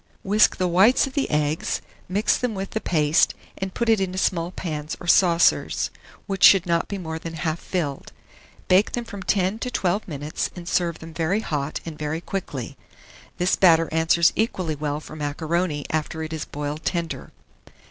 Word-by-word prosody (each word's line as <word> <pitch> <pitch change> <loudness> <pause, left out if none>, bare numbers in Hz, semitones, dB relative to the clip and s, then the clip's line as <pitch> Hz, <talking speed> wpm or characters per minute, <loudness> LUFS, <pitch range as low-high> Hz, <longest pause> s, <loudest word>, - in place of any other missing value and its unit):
Whisk 210 +2 +4
the 185 - +1
whites 190 +8 +5
of 270 - -8
the 280 - 0
eggs, 150 +1 0 0.3
mix 205 +4 +2
them 245 -4 -2
with 195 0 -5
the 220 - -2
paste, 155 -2 +2 0.2
and 190 0 -3
put 235 - -1
it 220 -3 +4
into 185 -1 -2
small 170 -3 0
pans 155 -4 -5
or - - -9
saucers, 170 -1 +3 0.3
which 195 -1 -3
should 195 -2 +8
not 170 -1 +1
be 200 - -4
more 160 -3 -5
than 165 0 -7
half 160 0 -2
filled. 150 -7 -3 0.6
Bake 185 +3 +4
them 240 -1 -2
from 205 -4 -8
10 190 +2 0
to 250 - -3
12 200 -3 -1
minutes, 150 -2 -3
and 175 -1 -9
serve 175 -2 0
them 160 0 -11
very 170 +6 0
hot 145 -6 -3
and 160 -2 -7
very 150 +1 -2
quickly. 150 -9 -5 0.6
This 180 +1 +2
batter 165 -3 +5
answers 160 +1 +3
equally 185 -7 -1
well 150 0 -3
for 155 - -11
macaroni 155 +1 -2
after 160 +1 -2
it 160 +1 -5
is 160 - -4
boiled 150 +2 -5
tender. 170 -2 -3
170 Hz, 180 wpm, -24 LUFS, 155-190 Hz, 0.6 s, should